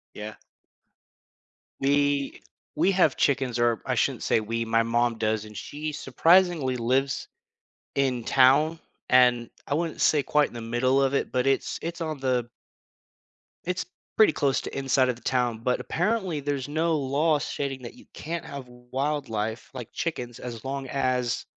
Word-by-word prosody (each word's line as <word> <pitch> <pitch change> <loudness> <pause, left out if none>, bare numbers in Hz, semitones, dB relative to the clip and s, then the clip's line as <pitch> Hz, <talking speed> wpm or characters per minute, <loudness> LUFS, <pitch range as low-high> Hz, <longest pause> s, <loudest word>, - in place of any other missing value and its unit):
Yeah. 105 +1 -7 1.4
We 140 0 +1 0.3
we 195 - +3
have 180 -7 +3
chickens, 135 -4 +1
or 120 -3 +2
I - - 0
shouldn't - - 0
say - - +3
we, 115 +2 -2
my 115 0 +2
mom 120 0 +1
does, 110 -1 0
and 105 0 -12
she 150 +7 -5
surprisingly 165 -3 +3
lives 130 +3 0 0.7
in 130 -4 0
town, 140 +5 +4 0.3
and 125 -2 +4 0.2
I 145 - -1
wouldn't 165 0 -2
say 150 -2 +4
quite 150 +1 +2
in - - -17
the 120 - -5
middle 130 +4 +1
of 135 0 +1
it, - - -1
but 125 0 +1
it's 135 0 0
it's 170 +1 -5
on 155 -2 -3
the 125 -3 0 1.2
it's 180 -1 -2 0.3
pretty 215 -8 +6
close 140 -2 +1
to - - -6
inside 135 -1 +2
of 125 - 0
the 120 - -17
town, 125 -3 0
but 125 +2 0
apparently, 185 -4 -1
there's 140 -2 -2
no 160 +2 +1
law 145 +3 +1
stating 135 -2 -4
that 120 - -8
you - - -17
can't 165 +1 -5
have 140 -3 -8
wildlife 125 -3 -3
like 125 -4 -7
chickens 125 -8 -4
as 120 0 -7
long 135 0 -3
as 130 -3 0
135 Hz, 160 wpm, -26 LUFS, 120-150 Hz, 1.4 s, pretty